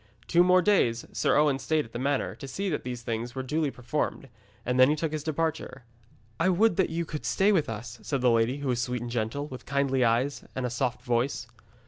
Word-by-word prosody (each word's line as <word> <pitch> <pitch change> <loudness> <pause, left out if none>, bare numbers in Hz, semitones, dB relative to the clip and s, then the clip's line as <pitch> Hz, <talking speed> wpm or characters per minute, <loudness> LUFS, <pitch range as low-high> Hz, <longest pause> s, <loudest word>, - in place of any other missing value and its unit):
Two 175 0 +5
more 180 0 +5
days 120 - +2
Sir - - +2
Owen 145 -2 +3
stayed 155 +1 0
at 115 - -15
the 120 - -5
manor 140 +1 0
to 135 - -9
see 195 +9 -3
that 150 - -2
these 125 -1 -5
things 115 +2 -4
were 130 - -3
duly 150 +3 0
performed, 135 +2 -3 0.4
and 125 +1 0
then 130 +1 +7
he 150 - +3
took 155 0 -2
his 155 -1 -3
departure. 155 -4 -2 0.6
'I 165 +3 +3
would 210 +5 +3
that 190 - +2
you 165 +1 -2
could 150 -4 -6
stay 190 - +2
with 170 - +2
us,' 115 +2 -6
said 140 -3 -2
the 125 -1 +4
lady, 115 +3 +2
who 140 -2 -3
was 120 -1 +1
sweet 125 -1 -2
and 120 - -5
gentle, 120 +5 -2
with 130 -3 -10
kindly 135 -2 +1
eyes 120 +4 +1
and 130 - -2
a 125 - -2
soft 125 0 -2
voice. 120 +2 0
135 Hz, 230 wpm, -28 LUFS, 120-155 Hz, 0.6 s, then